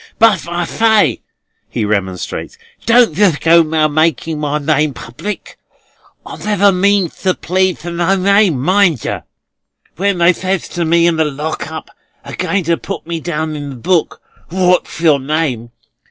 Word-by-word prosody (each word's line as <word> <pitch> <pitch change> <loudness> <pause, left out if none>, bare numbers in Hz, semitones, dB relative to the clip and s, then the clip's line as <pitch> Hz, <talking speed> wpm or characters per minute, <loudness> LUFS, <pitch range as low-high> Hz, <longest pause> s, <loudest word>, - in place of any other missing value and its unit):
"But, 215 -8 +3
I 175 0 -2
say," 215 - +2 0.5
he 115 -3 -2
remonstrates, 95 -3 -3 0.3
"don't 230 -7 +4
yer 195 -2 +4
go 170 +1 +5
a 155 -1 +1
making 155 0 0
my 150 0 -1
name 150 -1 0
public. 195 - -7 0.7
I - - -8
never 205 -1 +2
means 195 -1 +1
to 185 -1 +1
plead 185 +1 0
to 175 - -6
no 175 +3 +1
name, 195 -5 +3
mind 175 - +2
yer. - - -3 0.8
When 200 +1 0
they 175 +1 +4
says 185 +1 -2
to 170 -1 -2
me 170 +1 +3
in 170 -1 +2
the 160 - +2
Lock 150 +1 -4
up, 160 - -8 0.3
a - - -7
going 195 -2 -1
to 170 +1 +1
put - - -7
me 165 0 -4
down 160 -1 -3
in 145 -1 -6
the 135 - -7
book, 170 +7 -1 0.3
'What's 180 -2 0
your 155 -4 +4
name? 135 -5 -2
170 Hz, 165 wpm, -15 LUFS, 150-190 Hz, 0.8 s, go